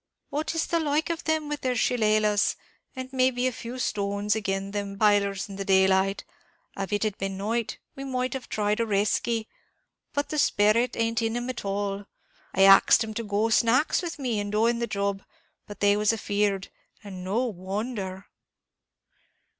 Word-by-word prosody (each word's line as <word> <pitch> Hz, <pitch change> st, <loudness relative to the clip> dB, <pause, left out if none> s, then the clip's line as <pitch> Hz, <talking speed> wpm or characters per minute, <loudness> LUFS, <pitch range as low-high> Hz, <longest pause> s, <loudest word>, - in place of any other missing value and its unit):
what 310 Hz, +3 st, -2 dB
is 330 Hz, -, +1 dB
the 335 Hz, -, 0 dB
like 310 Hz, +1 st, 0 dB
of 335 Hz, -, -5 dB
them 315 Hz, -1 st, 0 dB
with 295 Hz, 0 st, -4 dB
their 255 Hz, -1 st, 0 dB
shilelahs, 215 Hz, -3 st, +2 dB, 0.4 s
and 260 Hz, 0 st, -7 dB
may 260 Hz, 0 st, +4 dB
be 250 Hz, 0 st, -2 dB
a 255 Hz, -, +2 dB
few 240 Hz, +1 st, -7 dB
stones, 205 Hz, -2 st, -1 dB
agin 195 Hz, -2 st, -2 dB
them 200 Hz, -1 st, -4 dB
b -, -, -14 dB
pailers 200 Hz, -1 st, +2 dB
in 195 Hz, -1 st, -9 dB
the 195 Hz, -, -3 dB
daylight? 190 Hz, 0 st, +3 dB, 0.5 s
Av 195 Hz, -2 st, -4 dB
it 205 Hz, +1 st, 0 dB
had 215 Hz, -2 st, -1 dB
been 195 Hz, 0 st, -2 dB
at -, -, -7 dB
night, 225 Hz, +3 st, -2 dB, 0.2 s
we 270 Hz, -, -7 dB
might 255 Hz, -2 st, -2 dB
have 265 Hz, -1 st, -6 dB
tried 210 Hz, 0 st, 0 dB
a -, -, +3 dB
reskey; 220 Hz, +2 st, 0 dB, 0.7 s
but 285 Hz, -1 st, -2 dB
the 305 Hz, -, -1 dB
sperrit 225 Hz, +1 st, +3 dB
ain't 230 Hz, 0 st, +1 dB
in 225 Hz, +1 st, -1 dB
'em 245 Hz, +1 st, -2 dB
at 250 Hz, -, -8 dB
all. 200 Hz, 0 st, -3 dB, 0.4 s
I 195 Hz, -, +3 dB
axed 195 Hz, +4 st, +7 dB
'em 220 Hz, -1 st, -6 dB
to 230 Hz, -, -3 dB
go 210 Hz, +1 st, 0 dB
snacks 235 Hz, +8 st, +3 dB
with 340 Hz, -3 st, -5 dB
me 245 Hz, -6 st, -1 dB
in 205 Hz, 0 st, -3 dB
doing 230 Hz, +3 st, +2 dB
the 235 Hz, -, -1 dB
job, 200 Hz, -2 st, -2 dB, 0.5 s
but 205 Hz, -, -10 dB
they 205 Hz, 0 st, +5 dB
was 210 Hz, +1 st, +3 dB
afeard 205 Hz, -3 st, -1 dB, 0.3 s
and 190 Hz, -3 st, -8 dB
no 210 Hz, +7 st, 0 dB
wonder." 195 Hz, -1 st, -4 dB
215 Hz, 185 wpm, -26 LUFS, 200-250 Hz, 0.7 s, axed